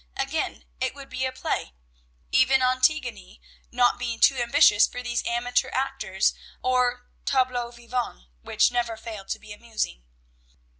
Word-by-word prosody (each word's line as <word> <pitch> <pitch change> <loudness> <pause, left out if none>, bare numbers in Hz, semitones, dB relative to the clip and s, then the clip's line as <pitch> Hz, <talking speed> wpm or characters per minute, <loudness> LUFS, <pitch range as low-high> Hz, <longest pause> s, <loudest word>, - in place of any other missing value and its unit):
Again, - - -2
it - - -1
would 275 -1 -11
be 260 - -1
a 260 - -1
play, 255 - -3 0.6
even 260 0 +4
Antigone 255 - +1 0.3
not 245 0 +3
being 235 -2 -3
too 275 - +6
ambitious 240 -4 +5
for 250 0 -7
these 240 0 -1
amateur 245 +2 0
actors 260 -8 0 0.3
or 250 -1 +1 0.2
tableaux 255 -3 +1
vivants, 240 - -5 0.2
which - - +2
never 235 -2 -1
failed 220 -3 -8
to - - -1
be 215 -1 -11
amusing. 215 - -4
245 Hz, 140 wpm, -25 LUFS, 230-255 Hz, 0.6 s, too